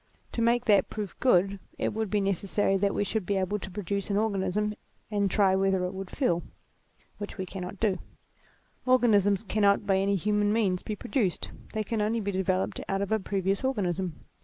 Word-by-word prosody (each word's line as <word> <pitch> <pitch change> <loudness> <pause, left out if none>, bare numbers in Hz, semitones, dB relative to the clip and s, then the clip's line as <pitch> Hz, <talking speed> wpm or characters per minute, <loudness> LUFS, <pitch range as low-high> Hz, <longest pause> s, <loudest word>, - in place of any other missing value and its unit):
To 230 - -2
make 235 +1 +3
that 205 -3 +4
proof 210 -4 -5
good 195 -5 +3 0.2
it - - -1
would 220 -1 -2
be 210 0 +1
necessary 195 +1 +1
that 200 +1 +1
we - - +1
should 215 0 -1
be 195 +2 0
able 190 +2 0
to 190 - -7
produce 200 +1 -3
an 200 - +1
organism, 210 0 0 0.4
and 200 -1 +1
try 195 -1 +3
whether 190 -1 +2
it 180 - -4
would 190 0 -6
feel; 175 - +1 0.8
which 205 - -6
we 190 - -3
cannot 185 +1 -7
do; 200 -5 +1 0.9
organisms 215 -6 +4
cannot 200 -1 +2
by 195 -1 +3
any 200 +1 +2
human 205 +2 +1
means 200 -5 +1
be 215 - -4
produced, 220 - -1 0.2
they 215 -1 -1
can 220 +1 -2
only 220 +2 +1
be 200 -2 -2
developed 105 - 0
out 195 0 0
of 200 - -5
a 220 - +3
previous 195 +2 -1
organism. 190 - -1
200 Hz, 190 wpm, -28 LUFS, 190-210 Hz, 0.9 s, that